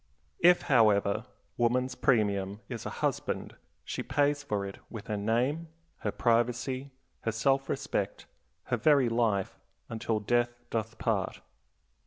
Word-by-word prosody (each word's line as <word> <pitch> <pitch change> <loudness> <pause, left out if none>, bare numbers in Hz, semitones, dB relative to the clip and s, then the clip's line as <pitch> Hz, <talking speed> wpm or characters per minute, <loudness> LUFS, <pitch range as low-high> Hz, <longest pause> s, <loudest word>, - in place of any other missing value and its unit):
If, 175 +1 +6
however, 110 -4 +3 0.3
woman's 125 +2 +2
premium 105 -5 +1
is - - -5
a - - -6
husband, - - -2 0.3
she - - -3
pays 145 0 +1
for 105 -7 -2
it 100 - -8
with 115 -3 -8
her 105 - -2
name, 120 +10 0 0.3
her - - -2
privacy, 120 +3 +1 0.3
her 115 - -1
self 135 +5 +1
respect, 135 -8 -2 0.4
her 120 - -1
very 135 0 +4
life, 115 -5 0 0.3
"until 110 -1 -1
death 120 +2 +1
doth 110 -1 -2
part." - - -1
120 Hz, 130 wpm, -30 LUFS, 105-130 Hz, 0.4 s, If